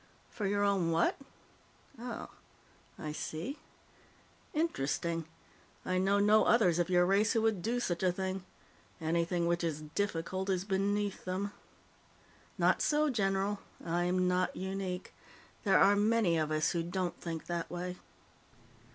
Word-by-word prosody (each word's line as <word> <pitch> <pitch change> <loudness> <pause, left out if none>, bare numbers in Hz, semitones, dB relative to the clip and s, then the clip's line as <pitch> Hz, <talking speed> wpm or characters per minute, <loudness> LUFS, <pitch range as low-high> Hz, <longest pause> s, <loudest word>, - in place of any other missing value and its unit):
"For 205 -3 -2
your 205 +1 +1
own 195 -4 +2
what? 165 +1 +2 0.8
Oh. 240 0 -6 0.7
I 155 -3 -5
see. 160 - -5 0.9
Interesting. 170 - -1 0.6
I 185 0 +1
know 195 +2 +3
no 210 +2 +5
others 185 -8 +4
of 175 - +1
your 180 -1 +4
race 200 +5 +3
who 225 -2 +2
would 220 -5 +1
do 235 +6 0
such 175 -8 -1
a 185 -1 +3
thing. 190 +1 -3 0.6
Anything 170 +1 0
which 170 0 +1
is 155 -2 -1
difficult 190 -1 -2
is 185 -1 0
beneath 200 0 0
them." 190 +2 -2 1.1
"Not - - +3
so, 300 0 +2
general. 195 -2 0 0.3
I'm 175 +2 +1
not 180 0 +1
unique. 190 -1 -4 0.5
There 195 - +5
are 200 +1 +6
many 210 -3 +3
of 155 -2 0
us 155 +1 +1
who 170 - 0
don't 175 +1 -3
think 165 -2 -5
that 170 -1 -3
way." 180 +1 -4
185 Hz, 140 wpm, -32 LUFS, 170-205 Hz, 1.1 s, are